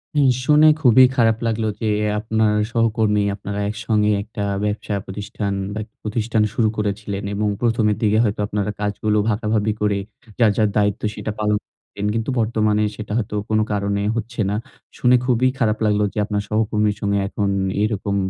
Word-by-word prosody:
হুম, 140 -3 +4 0.2
শুনে 150 +1 +6
খুবই 130 0 +7
খারাপ 115 -3 +3
লাগলো 110 -1 -1
যে 110 - 0 0.3
আপনার 110 -1 +1 0.2
সহকর্মী, 110 -2 +2
আপনারা 100 0 -5
একসঙ্গে 105 -1 +1
একটা 105 -1 -6 0.2
ব্যবসা 105 0 -2
প্রতিষ্ঠান 100 +1 -4 0.2
বা 110 - -3 0.2
প্রতিষ্ঠান 110 0 0
শুরু 110 -2 +2
করেছিলেন 100 -1 -3
এবং 105 +1 0
প্রথমের 115 -3 +2
দিকে 110 0 +3
হয়তো 105 -1 -1
আপনারা 105 0 -2
কাজগুলো 105 +1 0
ভাগাভাগি 110 0 0
করে 105 -1 +1 0.4
যার, 110 -3 +5
যার 105 -2 +3
দায়িত্ব 105 0 +1
সেটা 110 - -4
পালন 105 0 +1
করতেন। 100 0 -10
কিন্তু 115 +3 -2
বর্তমানে 110 -1 +1
সেটা 105 -1 -7
হয়তো 105 -2 -2
কোনো 110 0 +2
কারণে 100 0 -1
হচ্ছে 115 0 -3
না। 105 - -1 0.4
শুনে 125 0 +4
খুবই 125 0 +3
খারাপ 110 -2 +2
লাগলো 105 0 +2
যে - - -11
আপনার 105 -1 -2
সহকর্মীর 105 -1 +1
সঙ্গে 100 0 +1
এখন 100 0 -1 0.3
এরকম 100 -2 -1
105 Hz, 160 wpm, -21 LUFS, 105-110 Hz, 0.4 s, খুবই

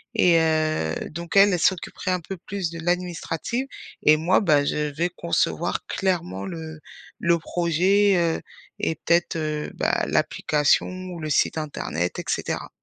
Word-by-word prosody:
et 175 -2 +5
heu, 155 - +1 0.2
donc 170 +4 -3
elle, 200 0 +7
elle 180 - +1
s'occuperait 185 +2 0
un 180 - +1
peu 185 +3 -7
plus 190 -1 -4
de 165 - -7
l'administrative 180 +7 -2 0.3
et 155 0 +6
moi, 170 +6 +3
bah, 150 -7 +3
je 150 0 -1
vais 170 +3 +1
concevoir 170 0 -1
clairement 160 - -1
le 160 +3 -7 0.4
le 170 0 +2
projet, 180 +5 +2
heu, 170 -1 +1 0.4
et 160 - 0
peut-être, 170 +2 +1
heu, 155 -1 -3
bah, - - 0
l'application 150 -2 +2
ou 185 -1 -7
le 155 - -4
site 150 - +2
internet 90 - -3
et - - -6
cetera. - - -2
170 Hz, 155 wpm, -24 LUFS, 155-180 Hz, 0.4 s, elle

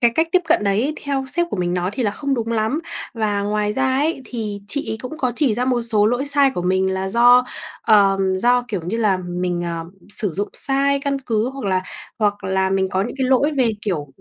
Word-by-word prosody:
cái 235 -2 +5
cách 320 +1 +2
tiếp 365 - +4
cận 320 -10 +3
đấy 215 +10 +1
theo 275 -2 -1
sếp 345 +4 0
của - - -2
mình 175 0 -1
nói 180 +1 -1
thì 255 - -1
là 210 - +1
không 275 +6 -2
đúng 230 -2 -3
lắm 220 +8 0 0.3
và 210 -3 0
ngoài 210 0 0
ra 265 +4 0
ấy 295 -1 0
thì 215 -4 -5
chị 285 +4 -1
ấy 220 - -3
cũng 310 +5 -7
có 255 -4 0
chỉ 275 -8 +2
ra 245 +3 0
một 250 -2 +1
số 215 -3 +2
lỗi 245 +4 +1
sai 280 -1 +3
của 175 - -2
mình, 190 +1 +1
là 190 0 -2
do, 245 +3 +6 0.4
ờm, 195 -3 +3
do, 245 +4 +3
kiểu 200 -5 -2
như 190 +6 -2
là, 210 -4 +2
mình, 175 -1 -3
à, 170 -1 -4 0.3
sử 205 -3 -2
dụng 205 +6 -2
sai 275 +1 +1
căn 275 -1 -1
cứ 230 -2 -1
hoặc 270 -3 -7
là 185 -1 +1 0.4
hoặc 205 -1 0
là 190 0 +1
mình 190 0 +1
có 190 +1 +1
nhữn 230 - -4
cái 260 - +1
lỗi 275 +4 +3
về, 240 -3 +4
kiểu, 170 -9 -2
220 Hz, 240 wpm, -20 LUFS, 190-265 Hz, 0.4 s, do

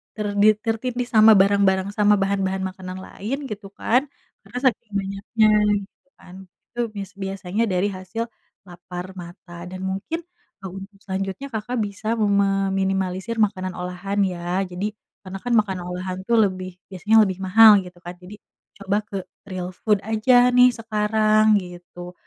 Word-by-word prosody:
ternit 210 0 +3
tertindih 245 +2 -2
sama 220 0 +7
barang-barang 195 0 +3
sama 210 0 +5
bahan-bahan 195 -1 0
makanan 185 -1 -8
lain 225 +8 -5
gitu 205 -1 -7
kan, 250 +5 +1 0.4
karena 230 +5 -8
saking 220 -1 -12
banyaknya 200 +3 0 0.4
gitu 275 - -45
kan 180 - -14 0.4
itu 240 - -9 0.2
bis 195 -2 -6
biasanya 195 +2 -2
dari 180 +2 +1
hasil, 185 +4 -5 0.4
lapar 180 0 -8
mata 175 0 -10
dan 185 +1 -8
mungkin 195 - -3 0.4
untuk 195 +2 -8
selanjutnya, 195 +7 -4
Kakak, 230 +1 -3
bisa 210 +2 -3
meminimalisir 195 0 0
makanan 185 -3 0
olahan 180 +3 -4
ya 180 -1 -1
jadi 180 +3 -3 0.4
karena 190 +1 -6
kan 245 0 -2
makanan 190 -4 0
olahan 185 +1 -4
itu 235 +5 -2
lebih 185 -2 -2 0.2
biasanya 200 +4 +2
lebih 190 -2 -3
mahal 220 +4 +8
gitu 180 -1 -12
kan 175 - -6
jadi 190 +4 -10 0.4
coba 200 0 -1
ke 200 - -7 0.3
real 180 -1 -4
food 210 -2 +3
aja 220 +3 +2 0.2
nih 250 0 +7
sekarang 215 -1 +2 0.2
gitu. 175 0 -10
195 Hz, 145 wpm, -22 LUFS, 185-215 Hz, 0.4 s, mahal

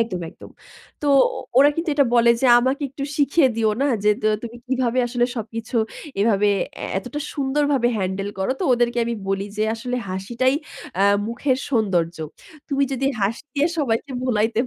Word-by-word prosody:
একদম, 195 -6 -1
একদম। - - -14 0.5
তো - - -1 0.3
ও - - -4 0.2
ওরা 285 +2 +7
কিন্তু 330 +1 -2
এটা 285 -1 +4
বলে 235 0 +5
যে, 265 - +3
"আমাকে 260 +4 0
একটু 275 0 -5
শিখিয়ে 285 0 +3
দিও 220 -1 +2
না, - - +3 0.2
যে 210 - +5
তা 215 - +3
তুমি 235 0 -7
কিভাবে 255 -1 0
আসলে 240 0 +1
সবকিছু 225 +2 -5 0.4
এভাবে 210 -1 +3 0.3
এ - - -2
এতটা 245 +8 -6
সুন্দরভাবে 280 -2 +1
হ্যান্ডেল 190 +1 -2
করো।" 190 - -1
তো - - 0
ওদেরকে 240 0 +1
আমি 235 - -2
বলি 195 0 0
যে, 215 - 0
"আসলে 250 +2 -4
হাসিটাই 235 +8 0 0.4
অ্যা 195 - +3 0.2
মুখের 255 +3 0
সৌন্দর্য। 180 -8 +1 0.5
তুমি 280 -1 +1
যদি 270 +1 -1
হাসি 210 +6 -1
দিয়ে 290 +4 +2
সবাইকে 265 -1 -1
ভুলাইতে 225 -2 +1
240 Hz, 170 wpm, -22 LUFS, 215-270 Hz, 0.5 s, ওরা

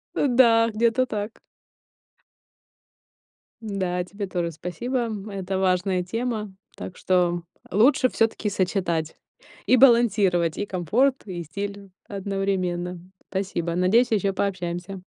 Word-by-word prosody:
Да, 235 -4 +4
где-то 235 +3 +2
так. 210 -1 -5 2.2
Да, 185 -4 -2
тебе 200 +2 -6
тоже 175 -2 -2
спасибо, 180 - -3
м. 210 -1 -6
Это 195 -1 -3
важная 185 0 +1
тема. 215 -1 -3 0.2
Так 180 - -7
что 175 -2 +1 0.3
лучше 255 +6 +4
всё-таки 225 -1 0
сочетать 180 -5 -1 0.5
и - - +5
балансировать 205 -9 +4
и 205 - -2
комфорт, 220 - +1
и 175 -2 -5
стиль 200 +4 -6 0.2
одновременно. 190 -3 -2 0.3
Спасибо. 180 -3 -2
Надеюсь, 220 +7 +3
ещё 200 -2 +1
пообщаемся. 185 -1 -3
195 Hz, 110 wpm, -24 LUFS, 180-220 Hz, 2.2 s, и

